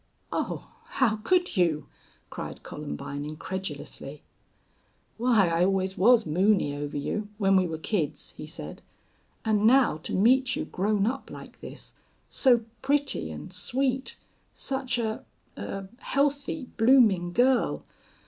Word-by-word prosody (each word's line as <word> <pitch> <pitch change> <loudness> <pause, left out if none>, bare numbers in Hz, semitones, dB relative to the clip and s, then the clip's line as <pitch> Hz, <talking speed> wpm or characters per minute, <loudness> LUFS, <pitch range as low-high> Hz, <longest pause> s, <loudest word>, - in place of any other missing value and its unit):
"Oh, - - -3 0.2
how 230 -5 +1
could 355 - +1
you!" 160 -5 +2 0.5
cried - - -7
Columbine, 140 - -6
incredulously. 150 -2 -6 1.0
"Why, 230 -6 +4
I 165 +1 +2
always 190 0 +1
was 230 +5 +5
moony 180 -1 +2
over 145 0 -4
you 205 +8 -3
when 195 -2 +3
we 185 -1 +4
were 160 -1 -4
kids," 160 -1 -2
he - - -8
said. - - -8 0.6
"And 215 -1 +3
now 255 - +5
to 155 - -4
meet 255 +6 +4
you - - -2
grown 200 +1 0
up 265 +4 -2
like - - -11
this - - -10 0.4
so 245 -4 +4 0.2
pretty 280 - +1
and 155 - -8
sweet 260 +6 -1 0.4
such 265 -2 -2
a 220 -2 -2 0.3
a 195 -1 -5
healthy, 285 +2 0
blooming 225 -8 +5
girl.... 250 +5 +2
210 Hz, 130 wpm, -27 LUFS, 175-255 Hz, 1.0 s, was